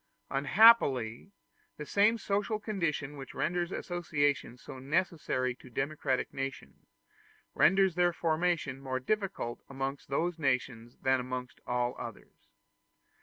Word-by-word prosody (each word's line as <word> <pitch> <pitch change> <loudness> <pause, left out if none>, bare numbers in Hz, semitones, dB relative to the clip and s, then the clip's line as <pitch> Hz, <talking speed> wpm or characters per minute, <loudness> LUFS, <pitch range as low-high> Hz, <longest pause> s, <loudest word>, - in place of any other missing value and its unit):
Unhappily, 140 - +4 0.5
the 150 - -6
same 210 +7 +3
social 210 +1 -1
condition 165 -9 -2
which 135 -2 -9
renders 175 +1 -1
associations 145 -9 -1
so 135 -3 -9
necessary 140 -4 0
to 130 - -16
democratic 135 0 -2
nations, 135 0 -6 0.7
renders 190 0 +4
their 175 0 +3
formation 160 -4 0
more 130 -1 -2
difficult 185 - -2
amongst 135 +1 -4
those 165 +4 -1
nations 125 -4 -1
than 130 0 +3
amongst 125 0 -5
all 125 0 0
others. - - -10
145 Hz, 115 wpm, -31 LUFS, 130-175 Hz, 0.7 s, Unhappily